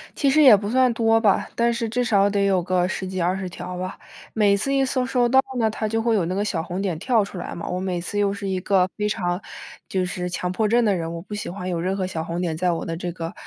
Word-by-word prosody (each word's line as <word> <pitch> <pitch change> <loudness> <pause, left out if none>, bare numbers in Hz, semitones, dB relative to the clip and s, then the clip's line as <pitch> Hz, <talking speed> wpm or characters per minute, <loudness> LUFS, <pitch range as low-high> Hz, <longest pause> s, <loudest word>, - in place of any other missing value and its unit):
其 280 - +2
实 305 +3 +4
也 255 -7 +9
不 205 +1 -3
算 255 0 +3
多 225 -1 +3
吧， 205 -4 +2
但 235 0 +2
是 230 -1 -2
至 245 +2 0
少 205 -3 +3
得 200 0 0
有 190 -2 +2
个 180 0 +1
10 190 0 -4
几、 185 -1 -3
20 185 +1 -1
条 180 +1 -7
吧， 185 +1 -5 0.4
每 205 -2 +4
次 275 +7 -1
一 270 0 +3
搜 255 -1 0
收 245 -2 +2
到 265 +2 +5 0.2
呢， 220 -1 +3
它 215 0 -3
就 225 +1 0
会 230 -1 +2
有 180 -5 +1
那 185 +2 -2
个 205 - 0
小 170 -6 -1
红 180 +2 -4
点 180 -5 -2
跳 230 -1 +2
出 200 -2 -8
来 175 - -5
嘛。 170 - -6
我 180 - -2
每 185 -2 -2
次 195 +4 -5
又 200 -1 +2
是 200 0 -5
一 190 -1 -1
个 185 -2 +2
非 210 0 0
常 180 -1 -2 0.5
就 185 -1 -1
是， 180 0 -4
强 180 0 -3
迫 215 +3 0
症 235 +2 +3
的 200 -2 +3
人， 165 -1 -3
我 165 - -6
不 210 - -10
喜 205 - -5
欢 185 0 -6
有 170 -2 -2
任 185 +3 -1
何 190 -2 -1
小 160 -3 -4
红 170 +1 -4
点 165 -3 -1
在 180 +2 +1
我 165 - -3
的 165 - -3
这 175 +1 -4
个， 165 +1 -6
195 Hz, 305 characters per minute, -23 LUFS, 180-225 Hz, 0.5 s, 也